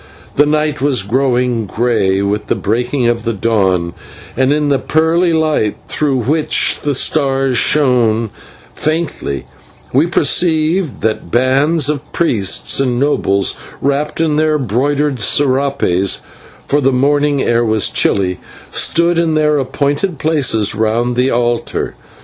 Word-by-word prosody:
The 145 - +3
night 150 -1 0
was 135 -7 +1
growing 125 0 0
grey 100 -4 0
with 105 +1 -2
the - - 0
breaking 120 +4 -1
of 120 0 0
the 115 +1 -2
dawn, 95 -5 0 0.4
and 130 +2 +2
in 150 0 +1
the 140 -2 +2
pearly 165 +3 +1
light, 155 -10 0
through 135 -5 -1
which 150 +6 +1
the 145 -2 -1
stars 135 -2 +1
shone 115 -6 +2 0.4
faintly, 155 - -3 0.5
we 145 +6 +3
perceived 165 -1 0
that 110 -5 -2
bands 135 - +2
of 150 0 -4
priests 110 - +1
and 125 -3 0
nobles, 100 -8 +1 0.2
wrapped 140 +3 -1
in 155 -2 +1
their 155 0 +2
broidered 140 +3 -1
/serapes/ 130 -7 +1 0.4
for 145 +1 +1
the 135 0 +2
morning 145 +2 +1
air 120 0 +1
was 110 -2 +1
chilly 95 -2 0 0.3
stood 170 0 +1
in 165 -2 +1
their 150 -1 +2
appointed 140 +6 -1
places 135 -9 +1
round 115 +3 0
the 125 +2 +1
altar. 120 -1 -1
135 Hz, 130 wpm, -15 LUFS, 115-150 Hz, 0.5 s, The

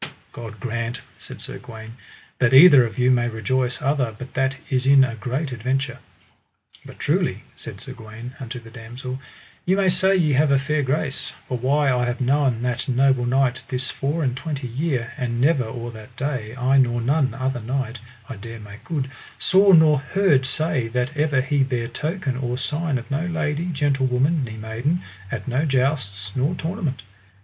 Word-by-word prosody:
God 110 -3 -9
grant, 115 +1 -3 0.2
said - - -8
Sir - - -6
Gawaine, 110 -1 -10 0.4
that 125 0 +4
either 145 -3 +9
of 110 - -11
you 125 0 +4
may 120 -1 +2
rejoice 125 +3 -1
other, 130 -5 0
but 130 +2 -9
that 135 0 0
is 130 0 0
in 135 -1 +7
a 130 -3 -1
great 130 +6 -3
adventure. 130 +3 -2 0.8
But - - -12
truly, - - 0
said - - -8
Sir - - -8
Gawaine 115 +3 -9
unto 125 -1 -6
the 115 -1 -14
damosel, 125 +2 -7 0.4
ye 185 - +2
may 195 -1 +3
say 190 +2 +4
ye 160 -6 +3
have 145 +3 +3
a 140 - +5
fair 145 +3 0
grace, 140 +1 -1
for 130 - -2
why 135 +3 +2
I 125 0 +1
have 120 +2 -2
known 130 -2 +1
that 125 0 -1
noble 130 -1 +3
knight 130 0 +2
this 130 0 -2
four 150 +4 -1
and 125 -3 0
twenty 140 -2 -4
year, 130 -1 -2
and 120 -1 -2
never 140 -1 +3
or 120 +1 -6
that 110 +2 -12
day, 130 -5 -3
I 130 +2 +3
nor 120 -2 +2
none 135 +3 +1
other 130 -2 -2
knight, 125 0 -3 0.3
I 130 - -7
dare 115 +2 -8
make 105 +1 -12
good, 135 -1 -3 0.3
saw 195 +1 +5
nor 160 -4 +6
heard 150 -3 +2
say 135 -5 0
that 125 +5 -2
ever 145 -3 +2
he 140 +1 +1
bare 125 -3 -2
token 150 +2 -3
or 125 -1 -2
sign 150 +2 -1
of 120 +1 -8
no 155 +5 -1
lady, 160 0 -1
gentlewoman, 140 -1 +1
ne 110 -2 -8
maiden, 115 +10 -2 0.3
at - - -4
no 130 +4 +1
jousts 125 -8 0
nor 140 +7 +1
tournament. 165 - -3
130 Hz, 185 wpm, -23 LUFS, 120-145 Hz, 0.8 s, either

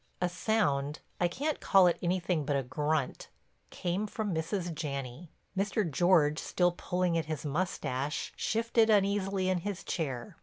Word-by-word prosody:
A 180 - +1
sound—I 170 -5 0
can't 290 - -2
call 190 -2 +5
it 175 - +3
anything 175 -2 0
but 145 0 0
a 135 - +1
grunt—came 155 - -3
from 210 -2 -3
Mrs. 170 +2 -2
Janney. 140 0 -5 0.3
Mr. 200 0 0
George, 160 -1 +3
still 180 -1 +1
pulling 175 -1 0
at 160 - -3
his 155 -1 -4
mustache, 145 -3 -2
shifted 225 0 +2
uneasily 195 -2 +2
in 185 -1 +2
his 200 +1 -4
chair. 135 -8 -4
175 Hz, 140 wpm, -31 LUFS, 150-195 Hz, 0.3 s, call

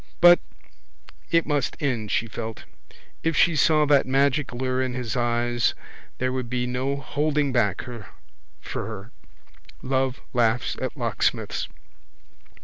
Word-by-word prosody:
But 175 0 +8 0.9
it 165 -1 +3
must 145 -4 -1
end, 120 -7 -1
she 115 - +1
felt. 110 -1 -6 0.6
If 165 -2 0
she 170 -2 +5
saw 155 0 +4
that 145 -2 +4
magic 140 +1 +2
lure 130 +1 -1
in 130 -1 -2
his 125 -4 -3
eyes 120 -1 +1 0.4
there 130 0 -1
would 130 -2 -3
be 125 0 -1
no 130 +3 -1
holding 145 +1 0
back 105 -7 +1
for 95 - -9
her. 110 +1 -8 0.7
Love 130 0 0
laughs 120 -1 +1
at - - -3
locksmiths. - - -1
130 Hz, 130 wpm, -25 LUFS, 120-140 Hz, 0.9 s, But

